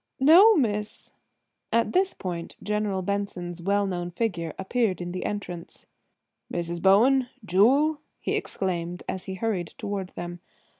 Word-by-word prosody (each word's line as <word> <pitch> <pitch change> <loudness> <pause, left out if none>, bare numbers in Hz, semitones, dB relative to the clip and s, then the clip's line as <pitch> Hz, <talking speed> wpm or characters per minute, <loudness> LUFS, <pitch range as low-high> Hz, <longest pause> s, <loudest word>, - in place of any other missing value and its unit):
"No. 355 +11 +8
Miss—" 210 -6 -1 0.6
At 230 0 +2
this 375 +1 +2
point 175 -3 -5
General 210 -2 -1
Benson's 180 -3 -3
well 200 +3 +1
known 175 -2 -3
figure 175 -4 -2
appeared 195 0 0
in 175 0 -4
the 185 - -4
entrance. 180 -5 -6 0.7
"Mrs. 170 0 -3
Bowen–Jewel–" 250 - +4 0.2
he - - -1
exclaimed 175 -2 -3
as 190 - -4
he 190 - -5
hurried 190 -4 -1
toward 195 -2 -4
them. 175 0 -6
195 Hz, 130 wpm, -26 LUFS, 175-230 Hz, 0.7 s, No